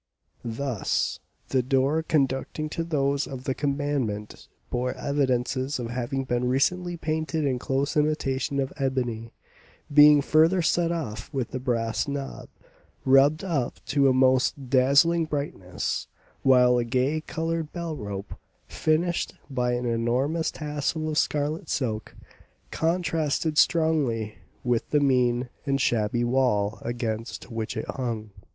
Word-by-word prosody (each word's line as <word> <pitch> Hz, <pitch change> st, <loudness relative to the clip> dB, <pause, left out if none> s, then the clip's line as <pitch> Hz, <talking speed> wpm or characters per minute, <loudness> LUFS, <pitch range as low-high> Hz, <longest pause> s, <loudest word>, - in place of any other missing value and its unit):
Thus, 120 Hz, -1 st, -1 dB, 0.3 s
the 130 Hz, -, +2 dB
door 135 Hz, +5 st, +2 dB
conducting 150 Hz, 0 st, -1 dB
to 165 Hz, -, -3 dB
those 140 Hz, -3 st, 0 dB
of 130 Hz, -2 st, -7 dB
the 130 Hz, -, -1 dB
commandant 140 Hz, -7 st, -2 dB, 0.2 s
bore 125 Hz, +1 st, -1 dB
evidences 130 Hz, -1 st, 0 dB
of 120 Hz, -2 st, -4 dB
having 125 Hz, +2 st, -2 dB
been 125 Hz, -1 st, -1 dB
recently 175 Hz, +7 st, +1 dB
painted 160 Hz, 0 st, -1 dB
in 130 Hz, -3 st, 0 dB
close 135 Hz, +3 st, -1 dB
imitation 140 Hz, -3 st, 0 dB
of 135 Hz, -1 st, -2 dB
ebony, 125 Hz, -5 st, -2 dB, 0.6 s
being 150 Hz, 0 st, +8 dB
further 165 Hz, +5 st, +4 dB
set 170 Hz, 0 st, +2 dB
off 115 Hz, -10 st, -4 dB
with 130 Hz, -5 st, -3 dB
a 130 Hz, -, -2 dB
brass 115 Hz, -3 st, -1 dB
knob 140 Hz, -1 st, -5 dB, 0.6 s
rubbed 140 Hz, +5 st, +5 dB
up 150 Hz, -10 st, -2 dB
to 140 Hz, -1 st, +4 dB
a -, -, +5 dB
most 130 Hz, +1 st, +2 dB
dazzling 140 Hz, +6 st, +4 dB
brightness, 140 Hz, -12 st, -3 dB, 0.3 s
while 125 Hz, -2 st, +5 dB
a -, -, +1 dB
gay 130 Hz, +6 st, 0 dB
coloured 165 Hz, 0 st, -3 dB
bell 170 Hz, -3 st, -4 dB
rope, 100 Hz, -5 st, -6 dB, 0.3 s
finished 170 Hz, +3 st, 0 dB, 0.2 s
by 125 Hz, -2 st, 0 dB
an 120 Hz, 0 st, -2 dB
enormous 125 Hz, +8 st, 0 dB
tassel 150 Hz, +1 st, -3 dB
of 150 Hz, -, -2 dB
scarlet 150 Hz, +2 st, -1 dB
silk, 110 Hz, -5 st, -2 dB, 0.6 s
contrasted 160 Hz, -2 st, 0 dB
strongly 140 Hz, -10 st, +1 dB, 0.2 s
with 120 Hz, -3 st, 0 dB
the 150 Hz, -, +3 dB
mean 125 Hz, -3 st, +2 dB, 0.2 s
and 135 Hz, 0 st, +1 dB
shabby 120 Hz, -1 st, +1 dB
wall 120 Hz, -4 st, +1 dB
against 115 Hz, 0 st, -4 dB
which 115 Hz, -1 st, -4 dB
it -, -, -3 dB
hung. 115 Hz, -5 st, -4 dB
135 Hz, 130 wpm, -26 LUFS, 120-150 Hz, 0.6 s, being